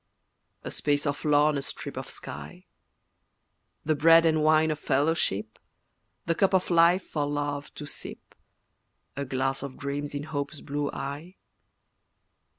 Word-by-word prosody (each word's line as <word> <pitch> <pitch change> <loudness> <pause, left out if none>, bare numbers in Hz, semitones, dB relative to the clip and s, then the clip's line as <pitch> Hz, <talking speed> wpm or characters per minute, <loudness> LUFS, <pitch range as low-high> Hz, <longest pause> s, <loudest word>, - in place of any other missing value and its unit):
A - - -5
space 145 0 0
of 145 -1 -2
lawn 150 0 +4
a - - -4
strip - - -6
of - - -6
sky, 75 +5 -9 1.2
The 155 - +3
bread 165 +2 +6
and 155 -1 +3
wine 155 0 +4
of 155 - -3
fellowship, 135 - 0 0.7
The 165 - +2
cup 195 +2 +2
of 185 -1 +1
life 170 +2 +4
for 145 -2 -1
love 145 0 -3
to 150 - -7
sip, - - -7 0.8
A 140 - -3
glass 135 +1 -1
of 135 -1 -7
dreams 145 +1 -4
in 145 - -3
Hope's 145 0 -4
blue 145 0 -2
eye. 150 +7 -6
145 Hz, 145 wpm, -27 LUFS, 140-155 Hz, 1.2 s, bread